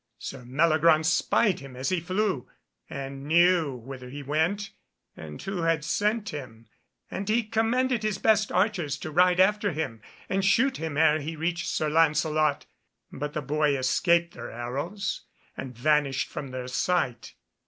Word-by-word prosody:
Sir 135 Hz, -2 st, -8 dB
Meliagraunce 155 Hz, +4 st, +3 dB
spied 185 Hz, +4 st, +2 dB
him 135 Hz, -2 st, -11 dB
as 130 Hz, +2 st, -2 dB
he 185 Hz, -2 st, +1 dB
flew, 185 Hz, -, -1 dB, 0.4 s
and 135 Hz, 0 st, -6 dB
knew 170 Hz, -3 st, +4 dB
whither 125 Hz, +1 st, -9 dB
he 145 Hz, +2 st, -7 dB
went, 165 Hz, +8 st, -1 dB, 0.4 s
and 75 Hz, -2 st, -9 dB
who 195 Hz, -2 st, -3 dB
had 165 Hz, -2 st, +1 dB
sent 210 Hz, +5 st, 0 dB
him; 120 Hz, -7 st, -8 dB, 0.4 s
and 195 Hz, +2 st, -4 dB
he 230 Hz, +2 st, +2 dB
commanded 230 Hz, +3 st, +1 dB
his 215 Hz, -2 st, -1 dB
best 210 Hz, 0 st, +2 dB
archers 180 Hz, -6 st, 0 dB
to 155 Hz, -, -6 dB
ride 180 Hz, +2 st, +4 dB
after 205 Hz, 0 st, +3 dB
him 140 Hz, -8 st, -4 dB, 0.3 s
and 195 Hz, 0 st, 0 dB
shoot 255 Hz, +7 st, +3 dB
him 160 Hz, -3 st, -4 dB
ere 155 Hz, -1 st, +4 dB
he 155 Hz, +3 st, -5 dB
reached 170 Hz, +3 st, -2 dB
Sir 155 Hz, -, 0 dB
Lancelot. 155 Hz, -1 st, +2 dB, 0.5 s
But 150 Hz, +2 st, -5 dB
the 155 Hz, -, -3 dB
boy 150 Hz, +1 st, +1 dB
escaped 170 Hz, +6 st, +2 dB
their -, -, -8 dB
arrows, 145 Hz, -, -4 dB, 0.3 s
and 125 Hz, -3 st, -7 dB
vanished 140 Hz, 0 st, +1 dB
from 140 Hz, -, -6 dB
their 130 Hz, -1 st, -6 dB
sight. 130 Hz, -3 st, -1 dB
160 Hz, 155 wpm, -27 LUFS, 140-190 Hz, 0.5 s, knew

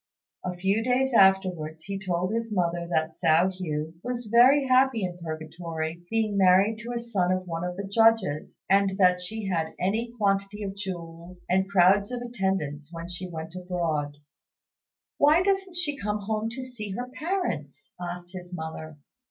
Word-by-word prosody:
A 180 Hz, 0 st, -3 dB
few 195 Hz, +5 st, +1 dB
days 255 Hz, +2 st, +1 dB
afterwards 185 Hz, -6 st, +3 dB
he 195 Hz, 0 st, -4 dB
told 185 Hz, +1 st, -1 dB
his 230 Hz, -1 st, -2 dB
mother 175 Hz, -3 st, 0 dB
that 160 Hz, -2 st, +1 dB
Hsiao 165 Hz, +4 st, +3 dB
hui 155 Hz, -3 st, -3 dB
was 245 Hz, +1 st, -4 dB
very 260 Hz, +4 st, +6 dB
happy 255 Hz, -3 st, +4 dB
in 180 Hz, -1 st, -4 dB
Purgatory, 160 Hz, 0 st, -5 dB
being 220 Hz, -2 st, 0 dB
married 195 Hz, +3 st, +4 dB
to 235 Hz, +2 st, -6 dB
a -, -, -2 dB
son 210 Hz, -7 st, 0 dB
of 185 Hz, 0 st, -1 dB
one 165 Hz, -1 st, -4 dB
of 180 Hz, 0 st, -4 dB
the 200 Hz, 0 st, -4 dB
Judges; 225 Hz, -8 st, +2 dB
and 195 Hz, 0 st, +3 dB
that 180 Hz, -2 st, +4 dB
she 215 Hz, +4 st, -5 dB
had 165 Hz, -4 st, -1 dB
any 220 Hz, +6 st, 0 dB
quantity 200 Hz, 0 st, 0 dB
of 195 Hz, -1 st, -4 dB
jewels, 175 Hz, -2 st, -8 dB
and 190 Hz, +2 st, +1 dB
crowds 200 Hz, +3 st, +4 dB
of 245 Hz, -1 st, -3 dB
attendants 190 Hz, -10 st, -2 dB
when 170 Hz, 0 st, -7 dB
she 180 Hz, +1 st, -6 dB
went 160 Hz, -1 st, -7 dB
abroad. 170 Hz, -5 st, -2 dB, 1.0 s
"Why 305 Hz, +5 st, +5 dB
doesn't 385 Hz, -2 st, 0 dB
she 310 Hz, -5 st, +1 dB
come 210 Hz, -3 st, -2 dB
home 215 Hz, +2 st, -2 dB
to 260 Hz, +3 st, -6 dB
see 225 Hz, -6 st, -6 dB
her 245 Hz, +5 st, -4 dB
parents?" 275 Hz, -, -4 dB
asked 175 Hz, 0 st, -6 dB
his 180 Hz, -1 st, -8 dB
mother. 160 Hz, -1 st, -7 dB
190 Hz, 170 wpm, -27 LUFS, 170-225 Hz, 1.0 s, very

